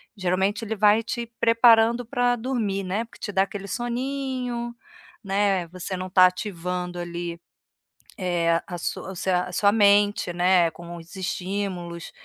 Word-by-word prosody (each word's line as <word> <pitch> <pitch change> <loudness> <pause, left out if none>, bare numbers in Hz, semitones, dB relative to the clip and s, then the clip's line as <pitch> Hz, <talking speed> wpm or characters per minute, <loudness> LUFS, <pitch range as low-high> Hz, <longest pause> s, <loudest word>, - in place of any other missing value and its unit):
geralmente 190 +3 0
ele 220 0 -3
vai 210 +2 +4
te 235 +1 -4
preparando 230 +1 +5
pra 245 0 +1
dormir, 220 -6 -2
né, 200 +5 -1
porque 230 - -17
te 205 - -5
dá 190 - +3
aquele 200 0 -7
soninho, 245 0 -3 0.5
né, 195 -3 +1
você 185 +1 -5
não 185 0 -5
tá 185 -1 +7
ativando 180 -2 -4
ali, 170 0 -5 0.8
eh, 170 -2 +1
a 175 -2 -6
sua 190 - -4
o - - -9
seu 185 +1 -1
a 180 0 -2
sua 200 +3 +3
mente, 205 -3 +3
né, 175 -1 +3
com 170 +2 -10
os 170 0 -12
estímulos. 185 -2 -4
195 Hz, 150 wpm, -24 LUFS, 180-225 Hz, 0.8 s, tá